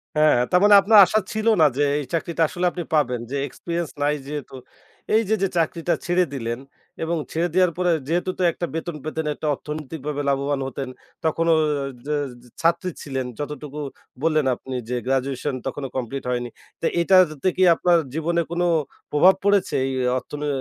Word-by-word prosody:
হ্যাঁ, 155 0 +5
হ্যাঁ। 120 +1 +2
তারমানে 205 +3 +6
আপনার 215 +2 +5
আশা 215 +4 +2
ছিল 220 +1 -2
না - - +8
যে 145 - +3 0.2
এই 145 - -4
চাকরিটা 165 0 0
আসলে 180 +3 -2
আপনি 175 - -5
পাবেন। 125 -5 +1
যে - - -2
এক্সপেরিয়েন্স 170 +4 -4
নাই 145 +1 +2
যেহেতু। 145 -2 -6 0.6
এইযে 220 -1 +2
যে - - +4
চাকরিটা 165 +1 0
ছেড়ে 180 0 +3
দিলেন 120 -2 -3 0.4
এবং 165 +1 -1
ছেড়ে 170 +2 0
দেওয়ার 185 -1 +4
পরে 180 -1 +1 0.2
যেহেতু 175 +3 0
তো - - +1
একটা 175 - -4
বেতন 165 0 -4
পেতেন, 160 0 -3
একটা 155 - -5
অর্থনৈতিকভাবে 150 -1 -5
লাভবান 140 0 0
হতেন। 135 0 -5 0.4
তখনো 165 +1 +2
ও - - +2 0.4
যে 150 - -1 0.3
য - - -17
ছাত্রী 170 +2 +2
ছিলেন। 135 -3 -3
যতটুকু 150 0 -6 0.4
বললেন 155 -3 +2
আপনি 130 +1 -7
যে 125 - -1
গ্র্যাজুয়েশন 135 +1 -1
তখনো 140 -2 -4
কমপ্লিট 130 +2 -3
হয়নি। 120 -1 -2 0.3
তা - - -2
এইটাতে 175 -3 +4
কি 185 - +4
আপনার 175 0 +3 0.2
জীবনে 170 +2 0
কোনো 175 +1 0 0.5
প্রভাব 180 +6 +6
পড়েছে? 200 -1 +2
এই - - -2 0.3
অর্থনৈ 150 +3 -5
155 Hz, 170 wpm, -23 LUFS, 140-175 Hz, 0.6 s, না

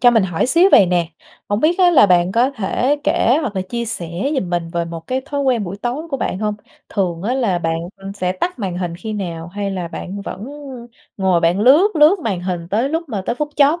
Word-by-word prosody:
cho 245 -1 +7
mình 225 -3 +3
hỏi 175 0 0
xíu 340 +8 +5
vầy 190 - +8
nè, 175 -2 +1 0.4
hổng 205 +1 0
biết 335 +4 +2
á 360 -2 +6
là 295 -11 +6
bạn 180 0 +3
có 245 +4 +3
thể 255 +3 0
kể 250 - +3
hoặc 240 -10 -4
là 190 - 0
chia 235 +5 -4
sẻ 180 -7 -4 0.3
giùm 190 -11 -2
mình 175 -1 -1
về 170 -1 -1
một 165 -1 -8
cái 260 +1 -1
thói 285 +1 -4
quen 255 -6 +1
buổi 185 +2 -6
tối 250 +10 -4
của 275 - -1
bạn 210 - -2
hông? 210 0 -1 0.3
Thường 175 -4 -2
á 235 +6 0
là 225 -9 +1
bạn 165 -1 -1 0.4
sẽ 185 -2 -1
tắt 345 - -3
màn 190 -5 -3
hình 175 -2 -3
khi 215 +5 -6
nào 170 -5 -5
hay 200 +2 -4
là 180 -3 -4
bạn 190 +4 -6
vẫn 200 +2 -7 0.7
ngồi 190 -3 +2
bạn 175 +4 +2
lướt, 320 - +5
lướt 310 +6 +6
màn 205 - -2
hình 175 -2 -4
tới 230 +6 +1
lúc 325 +2 -3
mà 210 -6 -3
tới 235 - 0
phút 300 +4 -2
chót, 295 +4 +4
205 Hz, 245 wpm, -19 LUFS, 180-265 Hz, 0.7 s, vầy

